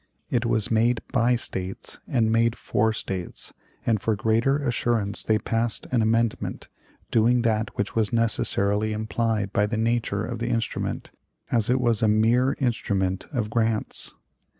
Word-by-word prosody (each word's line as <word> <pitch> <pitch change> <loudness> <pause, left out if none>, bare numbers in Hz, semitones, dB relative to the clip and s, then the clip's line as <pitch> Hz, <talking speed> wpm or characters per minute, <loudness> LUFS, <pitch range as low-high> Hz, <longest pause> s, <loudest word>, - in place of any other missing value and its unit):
It 120 -1 +1
was 110 -2 +1
made 115 +1 +3
by 120 -1 +3
States 95 -5 -5
and 115 -3 +1
made 115 +1 +2
for 110 +1 +1
States; 95 -4 -5 0.3
and 110 -4 +1
for 110 - +1
greater 115 +6 +2
assurance 120 -6 0
they 110 - +2
passed 115 +1 -1
an 125 -3 +2
amendment, 115 0 0 0.4
doing 120 +2 +3
that 110 -1 0
which 105 - -2
was 110 -2 +1
necessarily 110 -2 +1
implied 110 -2 -1
by 105 0 +2
the 110 +1 -2
nature 110 -2 0
of 120 -2 -5
the 120 +1 -2
instrument, 115 -1 -2 0.4
as 115 -2 +2
it 130 +1 +3
was 120 -4 +1
a 110 - +3
mere 115 +5 +3
instrument 100 -7 -1
of 115 -6 -2
grants. 115 -2 0
115 Hz, 150 wpm, -25 LUFS, 105-120 Hz, 0.4 s, made